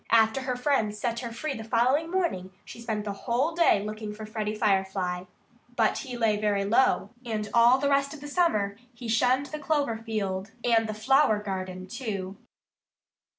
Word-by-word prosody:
After 225 +3 +4
her 255 -1 -2
friends 245 -5 0
set 235 +1 -2
her 235 -2 -5
free 275 +5 -3
the 225 - -6
following 255 +8 +2
morning 340 - -1 0.2
she 235 - -10
spent 215 -2 -3
the 205 - -3
whole 250 +9 -1
day 330 -12 +3
looking 215 0 -5
for 215 0 -7
Freddie 215 0 -3
Firefly. 190 -3 0 0.5
But 225 -2 +2
he 250 -2 -6
lay 220 -3 +2
very 205 -1 0
low. 230 +6 +2
And 215 -3 -3
all 235 +2 +6
the 280 +1 0
rest 280 0 +2
of - - -11
the 290 - -8
summer 215 - +1 0.2
he 235 0 -8
shunned 250 +4 +2
the 305 - -4
clover 285 -7 0
field 205 -3 -3
and 225 -2 +3
the 215 - -3
flower 235 0 +3
garden, 185 -2 -5
too. 200 -3 -5
225 Hz, 180 wpm, -27 LUFS, 210-260 Hz, 0.5 s, all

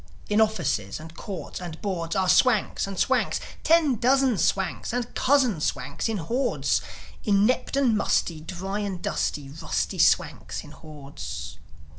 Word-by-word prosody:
In 210 +1 +4
offices 135 - 0
and 160 +1 -11
courts 190 +1 -6
and 170 -3 -7
boards 180 -5 -3
Are 190 -1 +2
Swanks, 220 -1 +3
and 195 -1 -6
Swanks, - - +1 0.2
ten 315 -6 +4
dozen 260 -2 +3
Swanks, 190 +6 0
And 245 -1 -2
cousin 255 - +2
Swanks 225 - -2
in 220 - -1
hordes 240 +10 0 0.4
Inept 210 +6 +2
and 255 -5 +3
musty, 170 -5 +1
dry 190 +5 -4
and 200 -3 -3
dusty, 145 -4 -2
Rusty 150 +3 -3
Swanks - - +2
in - - -12
hordes. 140 - -8
195 Hz, 140 wpm, -26 LUFS, 165-240 Hz, 0.4 s, In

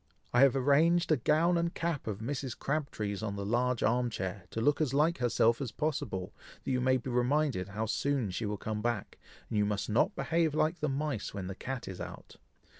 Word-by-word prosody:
I 120 - +4
have 135 -1 +6
arranged 160 +6 +3
a 155 - +5
gown 165 +7 +3
and 170 0 -1
cap 165 -7 -2
of 105 -1 -3
Mrs. 130 +1 -3
Crabtree's 110 -9 -2
on 105 -2 -3
the 100 0 -4
large 120 +3 +1
arm 120 +1 +2
chair, 95 -3 -4
to - - -4
look 145 +6 +2
as 140 -3 +1
like 155 +3 +3
herself 120 0 +3
as 125 -5 -3
possible, 110 -11 -2 0.3
that - - -2
you 125 -1 +1
may 130 +1 +3
be 130 +1 -5
reminded 125 -4 +1
how 105 +3 -3
soon 125 -1 0
she 105 +4 -2
will 105 0 -2
come 105 +1 -3
back, 120 -2 -2 0.3
and 105 - -1
you - - +4
must 105 +1 -1
not 110 - +2
behave 160 +2 +1
like 160 +3 +1
the 150 - 0
mice 135 -7 -2
when 95 -2 -4
the 95 - -4
cat 130 +5 -5
is 95 - -6
out. - - -9
125 Hz, 215 wpm, -31 LUFS, 105-150 Hz, 0.3 s, have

